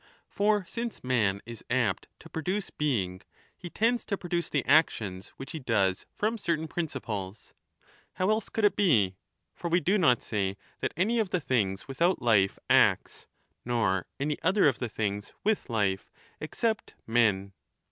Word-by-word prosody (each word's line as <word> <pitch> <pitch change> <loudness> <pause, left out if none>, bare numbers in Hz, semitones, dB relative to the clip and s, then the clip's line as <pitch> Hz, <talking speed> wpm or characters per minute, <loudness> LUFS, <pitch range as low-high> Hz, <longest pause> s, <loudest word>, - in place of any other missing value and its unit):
For 205 -1 +2
since 235 +4 -5
man 110 -6 +1
is 115 -1 -9
apt 120 -6 +1
to - - -12
produce 185 +6 -3
being, 100 -11 -1 0.3
he 175 - -8
tends 230 +6 +1
5 - - -14
to 200 - -1
produce 175 -1 -2
the 140 - 0
actions 105 - +2
which 135 0 -7
he 160 - -5
does 100 -8 +1
from 220 +2 -1
certain 165 -4 -1
prin 170 +1 -2
ciples. 105 -7 -6 0.6
How 185 +3 +1
else 215 -1 0
could 220 - +1
it 205 - +4
be? 115 - +3 0.4
For 170 - -5
we 175 +2 +4
do 190 +6 +2
not 125 -9 +4
say 100 -2 -1 0.2
that - - -2
any 225 +6 +2
of 215 -4 0
the 180 - 0
things 105 -10 -1
without 170 +7 +1
life 105 -5 +3
acts, - - +3 0.4
nor 110 -6 0
any 145 +1 -1
other 190 0 +4
of 135 - +1
the 120 - -2
things 105 -1 -3
with 215 -7 0
life, 100 -4 0 0.3
except 220 +8 -2
men. 105 -4 +2
135 Hz, 165 wpm, -29 LUFS, -, 0.6 s, it